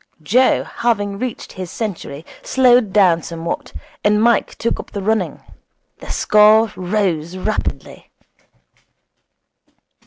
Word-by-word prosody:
Joe, 250 - +3
having 205 -4 -2
reached 255 -1 -5
his 185 -2 -7
century, 170 -8 -6 0.2
slowed 245 -5 +3
down 185 -5 +4
somewhat, 165 +1 -5 0.3
and 210 0 +3
Mike 235 +1 +2
took 235 - -2
up - - -8
the 200 - -5
running. 220 +2 -1 0.6
The - - -11
score 215 +1 +4
rose 180 -3 -2
rapidly. 215 +3 -4
210 Hz, 105 wpm, -18 LUFS, 180-225 Hz, 0.6 s, down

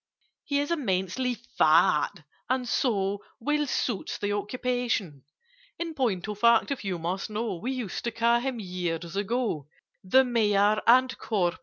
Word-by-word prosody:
"He 285 - 0
is 290 +3 -2
immensely 245 - -1
fat, 160 -5 +2 0.3
and 255 -1 0
so 200 -5 0 0.2
Well 295 +4 0
suits 240 -5 -2
the 205 - -2
occupation: 210 - -2 0.5
In 335 -1 -4
point 220 - -1
of 210 -1 -5
fact, 235 +4 +4
if 275 - -3
you 190 -3 -2
must 180 +5 -3
know, 215 -3 -3
We 240 +9 -3
used 245 -7 -4
to 235 - 0
call 235 +1 +2
him 255 -1 -3
years 175 -3 -4
ago, 205 - -1 0.4
The 260 +8 +5
Mayor 215 -3 +3
and 255 +2 +5
Corporation! 185 -5 0
215 Hz, 150 wpm, -27 LUFS, 190-250 Hz, 0.5 s, The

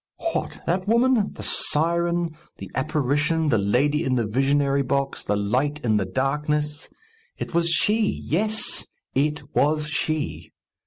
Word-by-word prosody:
What! - - -4
that 185 +3 0
woman! 235 -1 +3
The - - -9
siren, 170 +1 +1 0.2
the - - -9
apparition, 150 +3 +1
the 110 -6 +3
lady 140 +10 +2
in 130 -4 +1
the 120 -2 +1
visionary 140 +4 +2
box, 140 0 -1
the 105 - 0
light 130 +9 0
in 110 -2 +3
the - - 0
darkness! 150 +2 -1 0.5
It - - -6
was 170 0 +2
she! 210 +6 +2
Yes; 215 +7 -1 0.3
it 150 +2 0
was 150 +1 +2
she! 145 - -2
150 Hz, 140 wpm, -24 LUFS, 135-165 Hz, 0.5 s, woman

